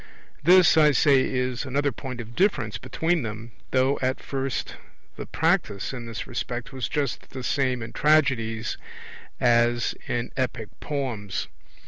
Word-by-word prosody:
This, 175 +1 +6
I 150 -2 +6
say, 140 0 +5
is 125 -1 -1
another 140 +2 0
point 130 -3 -7
of 115 0 -8
difference 195 +2 +1
between 165 0 0
them, 110 0 -6 0.2
though 130 +2 +2
at 130 0 0
first 135 -1 -3 0.4
the - - -7
practice 160 - 0
in 120 -2 -6
this 115 -2 -5
respect 120 +1 -4
was 130 -5 -3
just 145 -4 -2
the 130 -2 -7
same 130 -3 0
in 115 - -8
tragedies 130 -7 +2 0.6
as 120 0 +3
in 120 0 -2
epic 120 -4 -2
poems. 120 -9 -3
130 Hz, 140 wpm, -25 LUFS, 120-145 Hz, 0.6 s, This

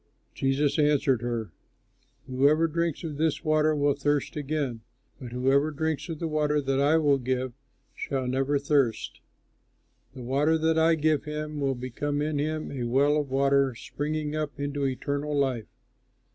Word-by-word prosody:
Jesus 135 +3 +1
answered 145 -5 +3
her, 115 -5 -3 0.7
"Whoever 140 +5 +3
drinks 170 0 -2
of 155 -3 -5
this 160 0 0
water 155 0 +2
will 145 -1 +2
thirst 145 0 -1
again; 145 -5 -2 0.4
but 125 -3 -8
whoever 135 +4 +2
drinks 160 +2 -2
of 165 - -4
the 165 - -3
water 150 -1 +1
that 135 -1 0
I 145 +3 +4
will 145 -3 +3
give 130 0 -2 0.4
shall 135 -2 -3
never 135 +3 +1
thirst. 140 -5 0 0.9
The 125 - -8
water 145 +6 +2
that 160 0 +2
I 165 +1 +4
give 155 -1 +1
him 150 0 -4
will 135 -1 0
become 130 +4 -3
in 150 0 -1
him 155 +1 -2
a 130 -3 -4
well 140 +4 +3
of 150 -2 -1
water 135 -1 +2
springing 150 +4 -3
up 150 -2 -3
into 140 -1 -1
eternal 145 +3 -2
life." 130 -6 0
145 Hz, 160 wpm, -27 LUFS, 135-155 Hz, 0.9 s, I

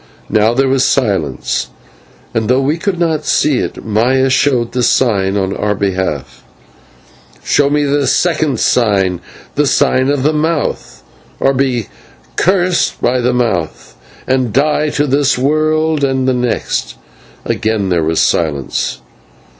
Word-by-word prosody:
Now 110 +2 +2
there 135 +1 +2
was 135 0 +2
silence, 95 - 0 0.7
and, 110 -1 -1
though 130 +1 +3
we 145 +4 0
could 195 0 -2
not 160 -3 0
see 145 -3 +1
it, - - -5
Maya 125 +5 +1
showed 130 -3 +1
the 125 - -1
sign 100 -6 +1
on 95 0 -1
our 105 0 -1
behalf. 90 -11 -3 1.0
"Show 145 -1 +2
me 150 0 +1
the 145 0 0
second 155 -8 +1
sign, 95 -7 +1 0.3
the 145 0 +1
sign 130 0 +2
of 140 -2 0
the 155 +2 +2
Mouth, 155 0 -2 0.4
or 135 - +2
be 130 -4 0 0.5
cursed 180 -1 +1
by 125 +1 +1
the 120 - +1
Mouth, 110 -10 -2 0.3
and 130 -3 0
die 150 +4 +1
to 145 0 0
this 140 -1 +1
world 155 +2 +1
and 130 -1 0
the 130 - +2
next." 125 - -2 0.5
Again 110 -3 -1
there 85 -3 +1
was 80 +1 0
silence. 70 -6 -1
130 Hz, 140 wpm, -14 LUFS, 105-145 Hz, 1.0 s, though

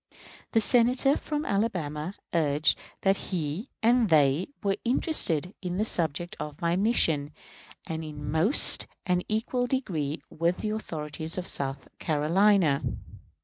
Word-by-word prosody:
The 225 - +5
Senator 250 +4 +3
from 300 0 -3
Alabama 180 -5 -2 0.2
urged 150 -2 +2 0.2
that 195 0 +2
he 175 - -3
and 235 -1 +4
they 150 +1 +3 0.2
were 195 -1 0
interested 200 - +2
in 180 -1 -3
the 215 - +1
subject 175 0 -2
of 150 -1 -6
my 170 0 0
mission 165 -8 +2 0.6
in 160 0 -4
almost 155 - +3 0.2
an 180 -1 +1
equal 245 +3 -1
degree 170 - -2
with 170 +2 -1
the 215 - -3
authorities 160 -5 -4
of 180 - -3
South 135 -5 -4
Carolina. 165 0 +2
175 Hz, 125 wpm, -27 LUFS, 150-215 Hz, 0.6 s, The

